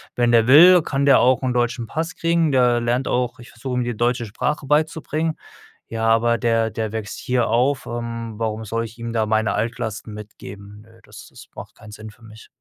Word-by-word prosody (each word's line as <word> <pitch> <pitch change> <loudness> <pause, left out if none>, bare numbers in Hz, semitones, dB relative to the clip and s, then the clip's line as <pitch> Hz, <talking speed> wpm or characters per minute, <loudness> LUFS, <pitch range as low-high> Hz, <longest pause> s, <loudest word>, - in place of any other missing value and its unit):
wenn 120 -1 +2
der 115 0 +4
will, 175 +6 +8
kann 140 -1 -2
der 140 - +6
auch 130 +1 +3
'n 130 -1 -1
deutschen 120 -1 -1
Pass 160 +1 -4
kriegen, 165 -3 +1
der 125 -2 +3
lernt 120 +3 -1
auch 125 -1 -1
ich 120 - -13
versuche 125 +2 -7
ihm 125 - 0
die 120 -3 -4
deutsche 120 0 0
Sprache 135 +7 -3
beizubringen, 155 +2 -1 0.5
ja, 115 0 -2
aber 115 +1 +2
der 115 -1 +1
der 110 0 -4
wächst 110 -3 -5
hier 125 -2 -1
auf, 130 +3 +1
ähm, 115 -1 -6
warum 110 0 -3
soll 115 +2 -3
ich 115 +1 -12
ihm 115 0 -6
da 115 -1 0
meine 110 0 0
Altlasten 115 -1 -4
mitgeben? 105 -1 -11
Nö, 115 +1 -21
das - - -13
das - - -15
macht - - -11
keinen 105 - -14
Sinn 110 +1 -10
für 110 - -25
mich. 110 0 -14
120 Hz, 210 wpm, -21 LUFS, 110-130 Hz, 0.5 s, will